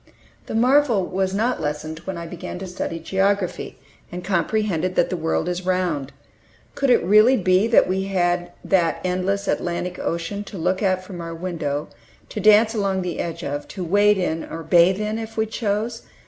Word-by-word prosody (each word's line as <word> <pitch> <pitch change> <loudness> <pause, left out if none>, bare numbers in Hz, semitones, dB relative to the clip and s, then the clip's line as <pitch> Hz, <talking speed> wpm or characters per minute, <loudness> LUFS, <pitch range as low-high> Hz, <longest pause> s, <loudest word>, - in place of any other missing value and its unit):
The - - -4
marvel 245 -4 +3
was 190 +1 -1
not 225 +4 0
lessened 155 +1 -4
when 190 -2 -4
I 170 - -6
began 170 +1 -7
to 190 - -6
study 180 -2 -4
geography, 190 +2 -1 0.3
and 180 0 -6
comprehended 185 -1 0
that 175 - +2
the - - 0
world 160 0 -1
is 180 +1 -2
round. 180 -7 -1 0.6
Could 275 - 0
it 245 - +4
really 215 +8 +6
be 185 +2 +3
that 230 - +5
we 190 +1 -1
had 175 -2 0
that 175 -4 +2
endless 185 +2 -1
"Atlantic 175 +1 -2
Ocean" 170 +5 -3
to 200 - -8
look 180 +3 0
at 185 -2 +1
from 185 -2 -8
our 165 0 -6
window, 160 -4 -3 0.4
to - - -5
dance 215 +1 +5
along 195 -3 0
the 180 -1 -4
edge 170 -1 -4
of, 145 +1 -4
to 190 - -6
wade 205 +4 +4
into 165 -3 -2
or 165 0 -5
bathe 175 +4 +4
in, 215 +1 -2
if 225 0 -7
we 220 - +2
chose? 220 +1 -2
185 Hz, 185 wpm, -22 LUFS, 170-205 Hz, 0.6 s, really